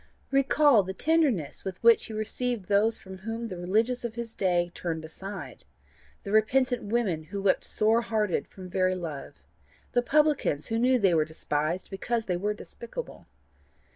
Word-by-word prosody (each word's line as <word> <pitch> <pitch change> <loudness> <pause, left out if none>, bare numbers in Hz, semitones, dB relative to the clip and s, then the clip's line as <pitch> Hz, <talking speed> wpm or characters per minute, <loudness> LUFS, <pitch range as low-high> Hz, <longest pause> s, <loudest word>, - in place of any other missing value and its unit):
Recall 275 -2 +5
the 190 0 -6
tenderness 285 - +1
with 190 -2 -5
which 230 -1 +6
he 220 - -8
received 215 0 -2
those 210 +3 +4
from 190 -1 -11
whom 225 +3 -4
the 185 - -5
religious 220 +8 0
of 235 -2 -4
his 235 -1 -5
day 175 -2 +1
turned 160 -2 -4
aside 180 - -8 0.6
the 200 - -5
repentant 245 +3 +3
women 205 -8 0
who 200 +5 -5
wept 195 -1 +2
sore 220 +2 +2
hearted 215 -5 -1
from 185 -1 -11
very 185 +1 +1
love, 160 -6 -6 0.6
the 245 - +3
publicans 290 - +1
who 225 0 0
knew 255 +2 +4
they 195 -6 +3
were 160 -2 +4
despised 155 +3 -3
because 225 +4 -2
they 180 - -1
were 205 +4 -1
despicable. 235 - -8
210 Hz, 165 wpm, -28 LUFS, 180-235 Hz, 0.6 s, which